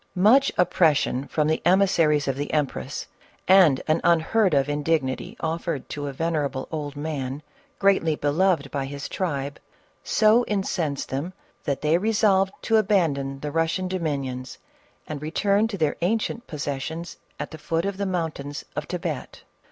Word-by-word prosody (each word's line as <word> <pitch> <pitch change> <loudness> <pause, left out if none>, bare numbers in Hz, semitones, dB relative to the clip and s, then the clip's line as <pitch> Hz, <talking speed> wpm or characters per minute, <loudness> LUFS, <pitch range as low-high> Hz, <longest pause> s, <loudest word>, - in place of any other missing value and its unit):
Much 230 +9 +5
oppression 155 -6 +2
from 150 -1 0
the 155 - +1
emissaries 170 -5 +3
of 135 - 0
the 145 +1 -4
empress 140 - -2 0.4
and 180 -7 +6
an 155 +1 +2
unheard 175 +5 +3
of 135 0 +3
indignity 145 -3 -1
offered 160 -2 -2
to 145 -1 -4
a. - - -3
ven 165 +5 -2
erable 140 -3 -2
old 150 -2 -4
man, 145 -2 -4 0.3
greatly 190 -6 +3
beloved 150 0 +1
by 140 - -2
his 140 +1 -6
tribe, 145 -6 -3 0.4
so 220 +2 +4
in 205 -2 0
censed 155 -8 -2
them 145 +8 -3 0.3
that 140 -2 -1
they 155 +3 +3
resolved 205 -2 +3
to 225 - +3
abandon 155 -10 +1
the 150 - -4
Eus 165 +1 +1
gian 185 -1 -2
dominions 140 -8 -3 0.5
and 150 -2 -6
return 200 +7 +1
to 215 -3 -5
their 155 -4 +1
ancient 225 +5 -1
possessions 150 +3 -4 0.2
at - - -5
the 160 - -9
foot 165 +3 -1
of 200 -1 -2
the 200 - -1
mountains 160 -5 -3
of 150 - -3
Thibet. 170 -5 -5
160 Hz, 160 wpm, -24 LUFS, 145-185 Hz, 0.5 s, and